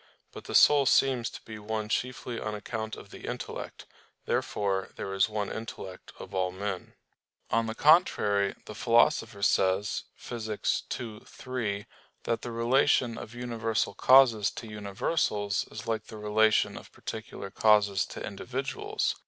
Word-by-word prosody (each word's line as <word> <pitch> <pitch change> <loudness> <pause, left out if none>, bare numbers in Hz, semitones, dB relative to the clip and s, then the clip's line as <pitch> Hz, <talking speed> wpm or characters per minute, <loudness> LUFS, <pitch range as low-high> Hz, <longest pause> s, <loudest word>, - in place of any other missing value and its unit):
But - - -10
the - - -4
soul 145 -2 +7
seems 125 -4 +3
to - - -11
be 110 -1 -8
one 110 0 -3
chiefly 125 +1 -2
on 110 -1 -3
account 110 +1 -4
of - - -12
the - - -9
intellect. - - -6 0.4
Therefore 95 -2 -1
there 95 - -5
is 95 +2 +3
one 105 -2 -2
intellect 95 -4 -7
of 100 - -10
all 95 -1 0
men. 95 0 -5 0.6
On 115 0 +2
the 110 - -4
contrary, 105 - +4
The - - -8
Philosopher 115 -2 +2
says 95 +1 +2
(Phys. 110 -3 -2
ii, 110 -4 -7
3) 110 -6 -4 0.4
that 115 - -1
the 120 - -5
relation 120 +1 +3
of 115 - -9
universal 115 -3 -1
causes 120 -2 +6
to 115 - -8
universals 105 0 -1
is 110 - -8
like 115 -1 -2
the 110 - -10
relation 110 +1 +2
of - - -16
particular 110 -3 -7
causes 105 -3 +4
to - - -6
individuals. - - -2
110 Hz, 145 wpm, -29 LUFS, 100-120 Hz, 0.6 s, soul